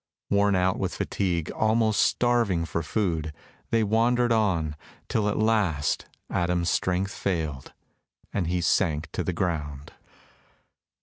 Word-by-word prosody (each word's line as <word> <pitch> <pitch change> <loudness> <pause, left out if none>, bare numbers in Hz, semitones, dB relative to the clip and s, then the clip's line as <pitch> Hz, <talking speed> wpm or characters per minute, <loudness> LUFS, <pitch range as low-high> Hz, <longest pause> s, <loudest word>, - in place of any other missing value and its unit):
Worn 100 0 +3
out 90 0 +1
with - - -2
fatigue, 85 -5 -1
almost 110 0 +2
starving 115 -9 +2
for 85 - -2
food, 80 -3 -1 0.4
they 115 -1 +2
wandered 120 +3 +2
on, 90 -9 +1 0.3
till 105 -2 +1
at 105 - -1
last 105 -10 +1 0.2
Adam's 85 0 0
strength 95 +2 0
failed, 80 -8 -3 0.6
and 95 -5 0
he 90 +1 0
sank 80 -3 +1
to - - -2
the - - -1
ground. 75 -5 -3
95 Hz, 125 wpm, -26 LUFS, 80-110 Hz, 0.6 s, Worn